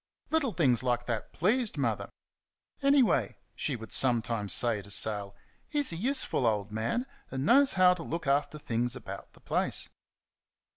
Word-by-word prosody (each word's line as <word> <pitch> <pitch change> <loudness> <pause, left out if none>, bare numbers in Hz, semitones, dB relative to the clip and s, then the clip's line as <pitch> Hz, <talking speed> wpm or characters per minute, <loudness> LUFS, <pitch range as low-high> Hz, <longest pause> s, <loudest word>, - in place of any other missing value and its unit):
Little 315 -6 +1
things 130 -10 +3
like 120 -1 0
that 115 -3 -3
pleased 220 +7 0
Mother. - - -1 0.7
"Anyway," 275 -4 +3 0.2
she 140 - -2
would 110 -2 -9
sometimes 115 -5 +1
say 115 -1 +1
to 100 - -14
Sal, 100 -1 0 0.3
"he's 290 - 0
a - - -4
useful 240 - 0
old 105 -2 0
man, 115 - -1 0.2
and 135 +1 -3
knows 275 - +5
how 185 -1 +6
to 180 - -8
look 165 0 -4
after 140 +2 +1
things 120 -3 -1
about - - -9
the - - -19
place." - - -1
135 Hz, 155 wpm, -30 LUFS, -, 0.7 s, how